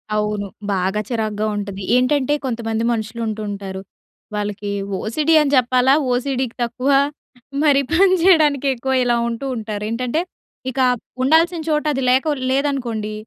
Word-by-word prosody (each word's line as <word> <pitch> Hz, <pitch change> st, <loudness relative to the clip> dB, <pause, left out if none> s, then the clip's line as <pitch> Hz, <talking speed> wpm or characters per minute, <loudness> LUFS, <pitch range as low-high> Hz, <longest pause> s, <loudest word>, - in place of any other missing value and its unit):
అవును, 210 Hz, -1 st, -1 dB, 0.3 s
బాగా 190 Hz, +2 st, 0 dB
చిరాగ్గా 215 Hz, -3 st, -2 dB
ఉంటది. 200 Hz, -1 st, -5 dB
ఏంటంటే 260 Hz, +2 st, +2 dB
కొంతమంది 225 Hz, -2 st, -2 dB
మనుషులుంటూంటారు. 215 Hz, -3 st, -4 dB, 0.5 s
వాళ్ళకి 205 Hz, -1 st, -3 dB, 0.3 s
ఓసీడీ 300 Hz, +9 st, 0 dB
అని 290 Hz, -2 st, 0 dB
చెప్పాలా 255 Hz, +1 st, +4 dB, 0.2 s
ఓసీడీ‌కి 255 Hz, -1 st, -1 dB
తక్కువ 250 Hz, +4 st, -1 dB, 0.7 s
మరి 285 Hz, -2 st, +4 dB
పని 375 Hz, +2 st, +5 dB
చేయడానికెక్కువ 280 Hz, -7 st, +3 dB
ఇలా 240 Hz, -1 st, +2 dB
ఉంటూ 235 Hz, +4 st, -5 dB
ఉంటారేంటంటే, 225 Hz, +6 st, -2 dB, 0.5 s
ఇక 265 Hz, -, -5 dB, 0.4 s
ఉండాల్సిన 325 Hz, +4 st, +3 dB
చోట 300 Hz, -1 st, +1 dB
అది 270 Hz, -1 st, -2 dB
లేక 270 Hz, +4 st, +2 dB, 0.2 s
లేదనుకోండి, 250 Hz, -6 st, -1 dB
245 Hz, 115 wpm, -20 LUFS, 215-275 Hz, 0.7 s, పని